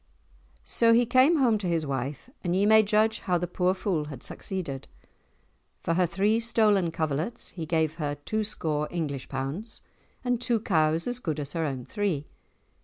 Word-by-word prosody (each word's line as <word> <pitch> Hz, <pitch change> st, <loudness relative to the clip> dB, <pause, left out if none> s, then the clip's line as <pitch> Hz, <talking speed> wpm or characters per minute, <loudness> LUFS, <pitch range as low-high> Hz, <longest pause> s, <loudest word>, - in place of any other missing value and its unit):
So 230 Hz, -1 st, +3 dB
he 240 Hz, +1 st, +5 dB
came 255 Hz, +7 st, +5 dB
home 235 Hz, -6 st, +3 dB
to 195 Hz, -, -3 dB
his 165 Hz, -2 st, 0 dB
wife 135 Hz, -, -4 dB, 0.2 s
and 175 Hz, -1 st, 0 dB
ye 195 Hz, +2 st, +3 dB
may 220 Hz, +1 st, +7 dB
judge 215 Hz, +1 st, +2 dB
how 180 Hz, -2 st, 0 dB
the 175 Hz, -, -1 dB
poor 180 Hz, +1 st, 0 dB
fool 185 Hz, -5 st, -1 dB
had 140 Hz, -4 st, -9 dB
succeeded. 165 Hz, -9 st, -5 dB, 1.0 s
For 165 Hz, -, +1 dB
her 180 Hz, +1 st, +2 dB
three 200 Hz, +6 st, +2 dB
stolen 215 Hz, -6 st, +3 dB
coverlets 160 Hz, -, -2 dB
he 165 Hz, -3 st, -6 dB
gave 160 Hz, -1 st, 0 dB
her 145 Hz, -3 st, -2 dB
two 215 Hz, +10 st, -2 dB
score 155 Hz, -7 st, -2 dB
English 150 Hz, -6 st, -4 dB
pounds, 140 Hz, -, -5 dB, 0.4 s
and 245 Hz, -1 st, 0 dB
two 240 Hz, -2 st, +2 dB
cows 160 Hz, -5 st, +1 dB
as 245 Hz, 0 st, -2 dB
good 160 Hz, -, -3 dB
as 145 Hz, -1 st, -4 dB
her 165 Hz, -1 st, -1 dB
own 130 Hz, -4 st, -4 dB
three. 175 Hz, -3 st, -1 dB
175 Hz, 180 wpm, -27 LUFS, 150-215 Hz, 1.0 s, may